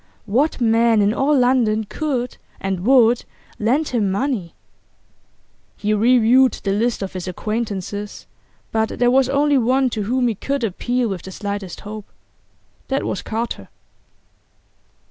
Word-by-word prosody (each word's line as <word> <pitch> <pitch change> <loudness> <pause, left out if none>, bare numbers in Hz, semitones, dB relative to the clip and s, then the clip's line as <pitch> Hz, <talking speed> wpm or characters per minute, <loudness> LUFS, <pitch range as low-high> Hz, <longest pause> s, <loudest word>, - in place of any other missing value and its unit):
What 260 +10 +1
man 230 -1 +3
in 205 +1 +3
all 280 +4 +2
London 245 -4 +2
could 250 +1 -3 0.2
and 195 -2 -2
would 245 -3 +5 0.4
lend 265 +8 +1
him 220 -5 0
money? 200 - -2 1.2
He 210 0 0
reviewed 245 +3 +4
the 195 - -3
list 220 +1 0
of 190 - -6
his 185 -1 -5
acquaintances, 205 0 -4 0.5
but 220 0 -1
there 245 0 +3
was 265 0 +3
only 285 0 +3
one 255 +2 +2
to 220 - -2
whom 245 +4 +1
he 230 - +1
could 275 +5 -3
appeal 240 +4 -1
with 190 -5 -4
the 190 - -9
slightest 200 -2 -5
hope 210 0 -8 0.8
that 270 0 -1
was - - -3
Carter. 230 +2 -4
230 Hz, 140 wpm, -20 LUFS, 205-255 Hz, 1.2 s, would